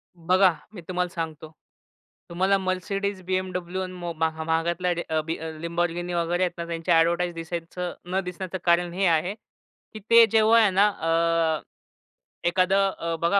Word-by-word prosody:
बघा, 180 Hz, +2 st, +4 dB, 0.2 s
मी 180 Hz, -, -9 dB
तुम्हाला 180 Hz, -1 st, -1 dB
सांगतो, 160 Hz, -2 st, -5 dB, 0.8 s
तुम्हाला 190 Hz, +3 st, +2 dB
Mercedes, 195 Hz, +1 st, -2 dB
BMW 185 Hz, -1 st, -2 dB
आणि 185 Hz, -, -7 dB
मो 175 Hz, -1 st, -5 dB
महा 160 Hz, 0 st, -1 dB
महागातल्या 170 Hz, +2 st, 0 dB, 0.2 s
र 155 Hz, -1 st, +1 dB
बी 165 Hz, +1 st, -2 dB
अ, -, -, -9 dB, 0.2 s
Lamborghini 175 Hz, +1 st, -2 dB
वगैरे 175 Hz, +2 st, 0 dB
आहेत 180 Hz, -1 st, 0 dB
ना, 170 Hz, -, -4 dB
त्यांचे 165 Hz, +1 st, -3 dB
ॲडव्हर्टाइज 170 Hz, +1 st, +3 dB
दिसायचं 170 Hz, +2 st, -5 dB, 0.2 s
न 190 Hz, -, +1 dB
दिसण्याचं 180 Hz, +1 st, -5 dB
कारण 170 Hz, 0 st, +2 dB
हे 195 Hz, +2 st, 0 dB
आ, 165 Hz, -3 st, +5 dB
हे 185 Hz, +4 st, -4 dB, 0.6 s
की 215 Hz, -, -7 dB
ते 230 Hz, 0 st, +8 dB
जेव्हा 225 Hz, +1 st, +5 dB
आहे 215 Hz, -3 st, +5 dB
ना 195 Hz, +3 st, +4 dB
अ, 165 Hz, -3 st, +1 dB, 0.9 s
एखादं 190 Hz, +2 st, +2 dB
अ, 165 Hz, 0 st, -2 dB
बघा, 170 Hz, +4 st, +3 dB
175 Hz, 160 wpm, -25 LUFS, 165-185 Hz, 0.9 s, ते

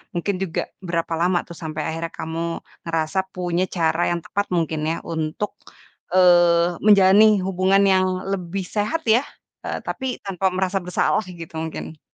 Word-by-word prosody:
mungkin 185 Hz, +3 st, -1 dB
juga 170 Hz, -3 st, -2 dB, 0.2 s
berapa 170 Hz, -2 st, -2 dB
lama 175 Hz, +1 st, +2 dB
tuh 170 Hz, -, -10 dB
sampai 155 Hz, -1 st, -5 dB
akhirnya 165 Hz, +1 st, -4 dB
kamu 165 Hz, +1 st, -3 dB, 0.3 s
ngerasa 165 Hz, +2 st, -1 dB
punya 180 Hz, 0 st, -1 dB
cara 165 Hz, 0 st, +1 dB
yang 175 Hz, -, 0 dB
tepat 205 Hz, 0 st, -1 dB
mungkin 160 Hz, -2 st, 0 dB
ya -, -, -1 dB
untuk, 160 Hz, +5 st, -3 dB, 0.6 s
eee, 175 Hz, -2 st, +5 dB
menjalani 200 Hz, 0 st, +7 dB, 0.2 s
hubungan 190 Hz, +1 st, +3 dB
yang 185 Hz, -1 st, +4 dB, 0.3 s
lebih 190 Hz, 0 st, -3 dB
sehat 215 Hz, +10 st, -1 dB
ya, 235 Hz, +5 st, +5 dB, 0.4 s
eee, -, -, -3 dB
tapi 265 Hz, -, -4 dB, 0.2 s
tanpa 190 Hz, -1 st, 0 dB
merasa 190 Hz, +1 st, 0 dB
bersalah 180 Hz, +4 st, +1 dB, 0.2 s
gitu 165 Hz, -1 st, -9 dB
mungkin? 160 Hz, -1 st, -7 dB
175 Hz, 150 wpm, -22 LUFS, 165-190 Hz, 0.6 s, menjalani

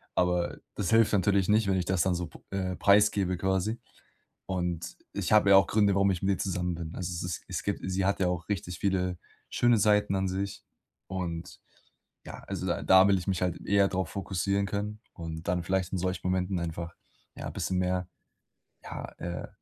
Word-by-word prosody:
Aber 90 Hz, -1 st, +1 dB, 0.2 s
das 95 Hz, -4 st, -1 dB
hilft 115 Hz, -1 st, +4 dB
natürlich 100 Hz, -1 st, +3 dB
nicht, 105 Hz, 0 st, +3 dB
wenn 95 Hz, -1 st, +2 dB
ich 90 Hz, -, -1 dB
das 95 Hz, -1 st, +1 dB
dann 95 Hz, -1 st, +2 dB
so 85 Hz, -1 st, -3 dB
p -, -, -15 dB
äh, 95 Hz, -2 st, -2 dB
preisgebe, 100 Hz, -2 st, +3 dB
quasi. 95 Hz, +5 st, 0 dB, 0.7 s
Und 90 Hz, -2 st, -3 dB, 0.2 s
ich 100 Hz, -2 st, -3 dB
habe 105 Hz, -2 st, +6 dB
ja 100 Hz, -, +8 dB
auch 95 Hz, -, +7 dB
Gründe, 100 Hz, -2 st, +3 dB
warum 100 Hz, 0 st, +4 dB
ich 90 Hz, -, -2 dB
mit 95 Hz, -, 0 dB
ihr -, -, -9 dB
zusammen 90 Hz, -2 st, -1 dB
bin. 80 Hz, -1 st, -6 dB
Also, 90 Hz, -1 st, -4 dB
es 85 Hz, -, -4 dB
es 90 Hz, -2 st, -4 dB
es -, -, -4 dB
gibt -, -, -2 dB
sie 95 Hz, 0 st, 0 dB
hat 100 Hz, +1 st, +1 dB
ja 90 Hz, -, +2 dB
auch 90 Hz, -1 st, -2 dB
richtig 90 Hz, -3 st, -3 dB
viele 90 Hz, -2 st, 0 dB, 0.3 s
schöne 120 Hz, -1 st, +3 dB
Seiten 105 Hz, -1 st, +3 dB
an 95 Hz, 0 st, 0 dB
sich. 95 Hz, +1 st, -3 dB, 0.4 s
Und 85 Hz, -2 st, -5 dB, 0.7 s
ja, -, -, -9 dB
also -, -, -4 dB
da -, -, -1 dB
da 95 Hz, +1 st, +7 dB
will 100 Hz, -1 st, +4 dB
ich 90 Hz, -, -6 dB
mich 95 Hz, -2 st, 0 dB
halt 90 Hz, -2 st, -1 dB
eher 100 Hz, -1 st, +4 dB
drauf 95 Hz, -3 st, -2 dB
fokussieren 100 Hz, +1 st, -1 dB
können. 105 Hz, +2 st, -4 dB
Und 80 Hz, 0 st, -7 dB
dann 90 Hz, -1 st, 0 dB
vielleicht 95 Hz, 0 st, -1 dB
in -, -, +1 dB
solchen 90 Hz, +1 st, -2 dB
Momenten 90 Hz, 0 st, 0 dB
einfach, 85 Hz, 0 st, -4 dB, 0.4 s
ja, -, -, -5 dB
bisschen 95 Hz, -, -2 dB
mehr, 90 Hz, -1 st, 0 dB, 0.8 s
ja, -, -, -6 dB
äh, 85 Hz, 0 st, -5 dB
95 Hz, 200 wpm, -29 LUFS, 90-100 Hz, 0.8 s, ja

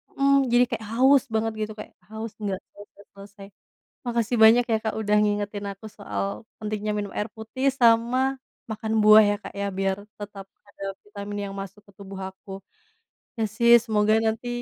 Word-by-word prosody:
mhm, 275 Hz, 0 st, +3 dB, 0.2 s
jadi 240 Hz, +1 st, +5 dB
kayak 225 Hz, -3 st, -4 dB
haus 265 Hz, +2 st, +5 dB
banget 225 Hz, 0 st, 0 dB
gitu 215 Hz, 0 st, -3 dB
kayak, -, -, -9 dB, 0.2 s
haus 220 Hz, 0 st, -6 dB
nggak 195 Hz, -2 st, -2 dB, 0.5 s
selesai. 200 Hz, 0 st, -13 dB, 0.6 s
Makasih 235 Hz, 0 st, 0 dB
banyak 235 Hz, +2 st, +7 dB
ya -, -, +4 dB
Kak, 220 Hz, -, -1 dB
udah 210 Hz, -1 st, +1 dB
ngingetin 205 Hz, 0 st, -2 dB
aku 195 Hz, +3 st, -12 dB
soal, 200 Hz, +1 st, -4 dB, 0.2 s
pentingnya 210 Hz, 0 st, -3 dB
minum 205 Hz, -1 st, -4 dB
air 210 Hz, -, -2 dB
putih 225 Hz, +5 st, -4 dB
sama, 235 Hz, +1 st, +4 dB, 0.5 s
makan 220 Hz, 0 st, -4 dB
buah 215 Hz, +1 st, +8 dB
ya 205 Hz, -, +1 dB
Kak -, -, -9 dB
ya, 200 Hz, -, -1 dB
biar 195 Hz, 0 st, 0 dB, 0.2 s
tetap 205 Hz, -1 st, -8 dB, 0.2 s
ada 200 Hz, -1 st, -10 dB, 0.2 s
vitamin 205 Hz, 0 st, -7 dB
yang 195 Hz, -, -8 dB
masuk 195 Hz, +1 st, -9 dB
ke -, -, -18 dB
tubuh 195 Hz, -1 st, -9 dB
aku. 190 Hz, +1 st, -16 dB, 0.9 s
Iya 225 Hz, -, 0 dB
sih 235 Hz, +1 st, +5 dB
semoga 215 Hz, -1 st, +2 dB
nanti, 225 Hz, +2 st, -1 dB
215 Hz, 170 wpm, -25 LUFS, 205-230 Hz, 0.9 s, buah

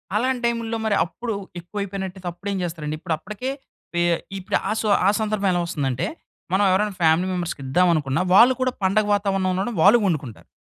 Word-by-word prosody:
అలాంటి 250 Hz, +3 st, +1 dB
టైముల్లో 230 Hz, -1 st, -1 dB
మరి 210 Hz, -2 st, +2 dB
అప్పుడు 225 Hz, +4 st, -5 dB, 0.2 s
ఎక్కువైపోయినట్టయితే 190 Hz, 0 st, -5 dB
అప్పుడేం 200 Hz, +3 st, -4 dB
చేస్తారండి? 155 Hz, -3 st, -4 dB
ఇప్పుడు 160 Hz, -, -2 dB
అప్పటికే 215 Hz, +10 st, -5 dB, 0.4 s
పె 175 Hz, -, +1 dB, 0.4 s
ఇప్పుడు 185 Hz, -, 0 dB
ఆ -, -, 0 dB
సు 220 Hz, -, -1 dB, 0.2 s
ఆ -, -, +6 dB
సందర్భం 210 Hz, -2 st, 0 dB
ఎలా 175 Hz, -, +1 dB
వస్తుందంటే, 135 Hz, -6 st, -2 dB, 0.5 s
మనం 195 Hz, +2 st, +3 dB
ఎవరైనా 205 Hz, +2 st, +1 dB
ఫ్యామిలీ 165 Hz, +3 st, +3 dB
మెంబర్స్‌కి 175 Hz, -5 st, -3 dB
ఇద్దామనుకున్న, 155 Hz, -2 st, +2 dB
వాళ్ళు 240 Hz, +6 st, +8 dB
కూడా 255 Hz, 0 st, +2 dB
పండగ 200 Hz, +3 st, +3 dB
వాతావరణం 195 Hz, -2 st, 0 dB
ఉండడం 195 Hz, +6 st, -2 dB
వాళ్ళు 210 Hz, +5 st, +7 dB
వండుకుంటారు. 145 Hz, -, -4 dB
190 Hz, 165 wpm, -23 LUFS, 170-215 Hz, 0.5 s, వాళ్ళు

